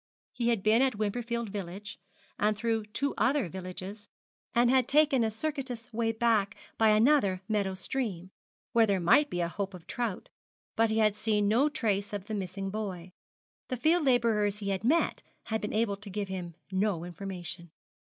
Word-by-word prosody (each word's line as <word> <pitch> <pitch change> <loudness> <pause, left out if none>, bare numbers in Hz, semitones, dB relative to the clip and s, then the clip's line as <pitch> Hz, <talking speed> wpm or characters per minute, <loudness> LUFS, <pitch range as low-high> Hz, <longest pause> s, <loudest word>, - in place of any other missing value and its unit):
He 235 - -1
had 225 -5 +1
been 220 +3 +4
at 265 -3 +2
Wimperfield 235 +2 -2
village, 200 +1 -6 0.4
and 210 0 +2
through 225 -1 0
two 275 +6 -1
other 270 -5 +2
villages, 190 +3 -7 0.5
and 240 +1 +5
had 260 -2 +3
taken 285 -4 +4
a 220 - +2
circuitous 250 -1 -5
way 225 0 +1
back 225 -3 +1 0.2
by 220 -1 +4
another 215 -4 +4
meadow 200 -3 0
stream, 190 -4 -3 0.4
where 230 -1 +5
there 200 -2 +2
might 290 - +4
be 175 - -2
a 170 - +1
hope 195 +2 -4
of 175 -2 -12
trout; 235 -6 -3 0.5
but 225 0 +3
he 220 - 0
had 215 -2 +3
seen 210 -1 +1
no 245 +8 +4
trace 205 -7 -1
of 200 -2 -4
the 215 - -5
missing 195 -1 -4
boy. 190 -4 -5 0.6
The 255 - -3
field 315 +7 +3
labourers 225 -5 +2
he 200 -2 -4
had 195 0 -1
met 310 +9 +2 0.2
had 220 -1 -2
been 210 - -3
able 215 -2 0
to 200 +1 -10
give 200 0 -3
him 180 -3 -5 0.2
no 190 -3 0
information. 175 -1 -6
210 Hz, 180 wpm, -30 LUFS, 195-235 Hz, 0.6 s, and